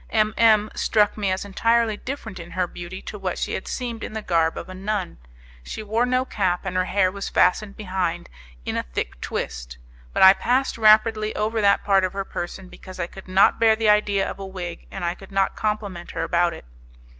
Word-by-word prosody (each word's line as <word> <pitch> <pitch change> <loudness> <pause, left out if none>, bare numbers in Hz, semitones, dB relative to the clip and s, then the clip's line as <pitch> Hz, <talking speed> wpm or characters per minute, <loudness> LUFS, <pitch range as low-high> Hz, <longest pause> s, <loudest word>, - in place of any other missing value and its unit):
M 215 -1 +2
M 215 -2 +4
struck 210 -2 +2
me 200 -3 -1
as 185 +2 -2
entirely 230 +2 +2
different 220 -5 -7
in 170 0 -9
her 185 - +2
beauty 175 +2 -8
to 210 - -7
what 185 -2 -3
she - - -2
had - - -4
seemed 235 -3 -4
in - - -6
the 220 -1 -4
garb 165 -3 +1
of - - -6
a 185 - -8
nun. 195 - -3 0.4
She 140 - -7
wore 225 +4 +1
no 255 +1 +1
cap, 185 -6 -1
and 190 -1 -3
her 185 0 +2
hair 185 -1 +2
was 200 +1 -5
fastened 200 +2 +2
behind 185 -4 -2 0.4
in - - -2
a - - +1
thick - - -5
twist; - - -5 0.3
but - - +2
I 190 0 +10
passed 255 +6 0
rapidly 215 0 +4
over 220 +1 0
that 200 -1 +3
part 195 -2 +3
of 185 - -1
her 195 0 -3
person, 185 +1 -6
because 185 0 -12
I 170 - 0
could 190 +2 -12
not 190 +1 +4
bear 225 -1 +5
the 220 -1 +1
idea 205 -2 +3
of - - -6
a 195 - -6
wig, 180 -3 -7
and 185 -3 -5
I 170 - 0
could 195 +2 -14
not 195 0 +1
compliment 205 -5 -3
her - - 0
about 175 -1 +1
it. - - -12
195 Hz, 220 wpm, -23 LUFS, 185-215 Hz, 0.4 s, I